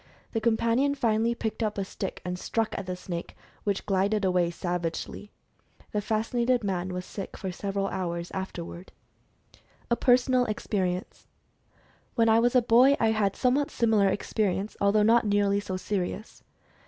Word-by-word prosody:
The 225 - -1
companion 235 +5 +2
finally 230 -2 +1
picked 225 0 -3
up 215 -2 -1
a 195 - -1
stick 195 0 -5
and 180 0 -3
struck 225 +2 -1
at 195 - -5
the 180 - -2
snake, 175 -1 -6 0.3
which 200 -2 -1
glided 200 +2 +1
^away 180 -2 +2
savagely. 175 +3 -4 0.6
The 210 - -1
fascinated 235 +3 0
man 185 -2 -1
was 180 0 -4
sick 195 - -7
for 190 - -4
several 195 +1 -2
hours 170 -2 -3
afterward. 180 -1 -6 1.0
A - - +5
PERSONAL 250 +1 +3
EXPERIENCE. 190 -4 -3 0.9
When 230 -2 +4
I 225 +1 +5
was 240 +2 +2
a 250 - +5
boy, 250 +5 +5
I 225 -1 +3
had 205 -3 +1
a - - -15
somewhat 275 +4 +2
similar 220 -7 +3
experi 200 0 0
ence, 200 +3 -5
although 200 +1 +4
not 230 +1 +4
nearly 200 0 +2
so 195 -2 -4
serious. 200 +2 -4
205 Hz, 160 wpm, -27 LUFS, 185-230 Hz, 1.0 s, A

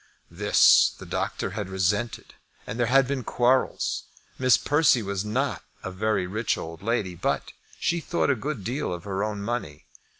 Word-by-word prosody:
This - - +5
the - - -10
doctor - - -3
had 100 -3 -4
resented, 100 +5 -1 0.3
and 110 - -6
there 120 - +2
had 135 +2 +5
been 135 -2 -2
quarrels. 125 +3 +1 0.3
Miss 130 -3 +5
Persse 145 -5 +3
was 100 -1 -2
not 125 +6 -1 0.2
a 90 - -4
very 100 0 0
rich 105 +5 -1
old 80 +1 -7
lady, 105 -4 -1
but 85 - -2 0.3
she 170 - 0
thought 165 -3 0
a - - +2
good 130 -2 -4
deal 125 +4 -2
of 85 -1 -5
her 100 0 -2
own 105 -1 -3
money. 100 -10 -4
110 Hz, 170 wpm, -26 LUFS, 95-130 Hz, 0.3 s, This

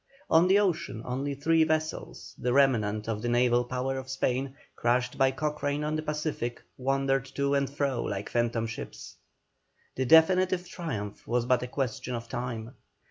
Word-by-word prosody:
On 165 +3 +6
the 190 +2 +5
ocean, 170 - 0
only 135 +3 -2
three 160 +3 +3
vessels, 155 0 -2
the 125 0 0
remnant 110 -6 +2
of 110 -2 -2
the 120 - -1
naval 120 0 +3
power 130 +2 -2
of 130 0 -9
Spain, 135 0 -1 0.2
crushed 125 +1 +1
by 135 -1 +4
Cochrane 150 +1 -2
on 155 +1 -1
the 155 - -1
Pacific, 150 -6 -3
wandered 135 0 0
to 140 0 +1
and 140 -1 +1
fro 140 -3 -1
like 100 0 -3
phantom 120 -1 0
ships. 115 0 -8 0.8
The 130 - -1
definitive 180 +3 +5
triumph 110 - -5
was 120 0 +1
but 125 -1 +3
a 125 - -3
question 130 -1 -3
of 115 0 -6
time. 120 -1 -4
135 Hz, 165 wpm, -28 LUFS, 120-150 Hz, 0.8 s, On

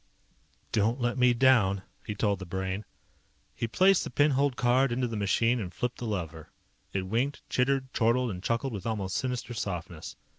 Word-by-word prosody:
"Don't 115 +4 +1
let 120 -1 0
me 125 0 +6
down," 115 -6 +4 0.2
he 105 - -5
told 100 -2 0
the 95 - -6
Brain. 95 +3 -3 0.7
He 115 - -3
placed 190 +9 +4
the - - -5
pin 145 +1 +3
holed 140 -1 +1
card 125 +2 +3
into 125 +1 0
the 115 - -5
machine 115 +4 +2
and 95 -5 -4
flipped 125 +6 -3
the 120 - -4
lever. 80 -6 -4 0.4
It 95 - -1
winked, 120 +9 -2
chittered, 130 0 +1
chortled, 120 +1 +2
and 90 -2 -6
chuckled 115 +5 -1
with 100 +1 -5
almost 100 -4 -2
sinister 125 +1 -2
softness. 90 -6 -5
115 Hz, 180 wpm, -29 LUFS, 95-125 Hz, 0.7 s, me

